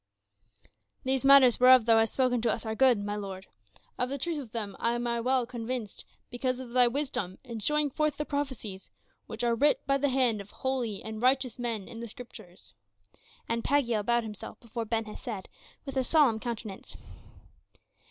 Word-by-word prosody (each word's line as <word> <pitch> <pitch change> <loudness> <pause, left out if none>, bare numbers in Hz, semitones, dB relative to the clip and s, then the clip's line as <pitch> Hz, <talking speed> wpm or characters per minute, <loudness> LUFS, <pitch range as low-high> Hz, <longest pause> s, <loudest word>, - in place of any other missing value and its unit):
"These 265 0 0
matters 275 -3 +7
whereof 255 -2 +7
thou 225 -1 +5
hast 225 0 0
spoken 250 -3 +2
to 235 - +1
us 230 - -4
are 220 - -2
good, 255 0 +4
my 205 0 -3
lord; 195 -2 -6 0.5
of 250 - 0
the 280 - -3
truth 320 +3 -3
of 250 -6 -9
them 210 -4 -4
am 240 +1 0
I 235 0 -1
well 255 0 +1
convinced, 235 -2 -5 0.3
because 255 +1 -2
of 255 -2 -8
thy 250 0 +5
wisdom 240 -8 -2
in 235 -4 -7
showing 300 +5 +1
forth 305 +1 0
the 300 - -2
prophecies 260 -10 -4 0.4
which 225 +1 -6
are 235 -1 +2
writ 290 +6 +2
by 275 0 +1
the 285 +1 +1
hand 250 -5 +2
of 200 - -13
holy 250 -6 -3
and 220 0 -6
righteous 255 0 +1
men 230 -5 -3
in 225 - -9
the 235 - -6
Scriptures," 215 -6 -12 0.7
and 230 0 -1
Pagiel 240 -6 +1
bowed 235 +2 +2
himself 210 -2 -8
before 235 0 -5
Ben 225 0 -1
Hesed 215 -2 -7 0.4
with 275 - -6
a 260 - +2
solemn 255 -5 +3
countenance. 225 -4 -6
240 Hz, 180 wpm, -29 LUFS, 220-260 Hz, 0.7 s, matters